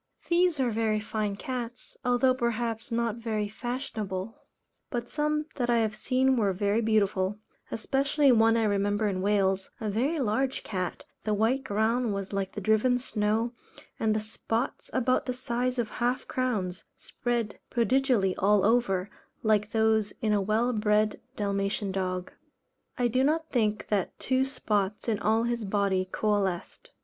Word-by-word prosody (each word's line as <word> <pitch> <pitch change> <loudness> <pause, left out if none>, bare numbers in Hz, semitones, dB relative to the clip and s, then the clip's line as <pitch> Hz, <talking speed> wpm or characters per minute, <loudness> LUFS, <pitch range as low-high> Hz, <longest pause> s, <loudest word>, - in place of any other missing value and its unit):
These 345 -3 +3
are 250 -3 +2
very 220 -1 +1
fine 210 -1 -2
cats, 245 +1 -6
although, 250 +1 +3
perhaps 235 -2 -2
not 230 -1 0
very 220 -3 -2
fashionable, 220 -3 -4 0.5
but 240 -2 -3
some 300 0 0
that 245 -2 0
I 240 - +4
have 220 -2 +1
seen 255 +4 +2
were 205 -4 +2
very 205 +4 +1
beautiful; 205 -3 +1 0.3
especially 275 +4 +2
one 225 -1 +5
I 225 - +2
remember 205 0 +1
in 190 -2 -1
Wales, 195 -1 +1
a 215 -2 -2
very 265 +10 0
large 260 +2 0
cat, 185 -3 -4 0.2
the 215 -1 +1
white 235 +6 +1
ground 220 0 +1
was 195 0 -5
like 195 -1 -2
the 210 - -5
driven 220 +5 +3
snow, 225 -1 0 0.5
and 215 -1 +2
the - - +2
spots 225 +3 -3
about 255 0 +1
the 250 - 0
size 250 0 -2
of 230 -3 -1
half 245 +1 0
crowns, 210 -8 -2
spread 235 -3 -3
prodigally 235 -4 +2
all 200 0 +4
over, 205 -5 +2 0.4
like 210 -1 +2
those 220 -2 +2
in 215 -2 +1
a 205 - +2
well 220 +5 +1
bred 210 -1 +2 0.2
Dalmatian 200 0 -1
dog; 185 -1 -2 0.7
I 245 - +2
do 255 +3 +2
not 320 +3 +1
think 215 -4 0
that 200 -4 0
two 260 +1 +1
spots 210 -7 -1
in 215 -3 +1
all 220 +2 +2
his 235 -1 -1
body 195 -2 0
coalesced. 200 -4 -1
220 Hz, 155 wpm, -28 LUFS, 205-245 Hz, 0.7 s, one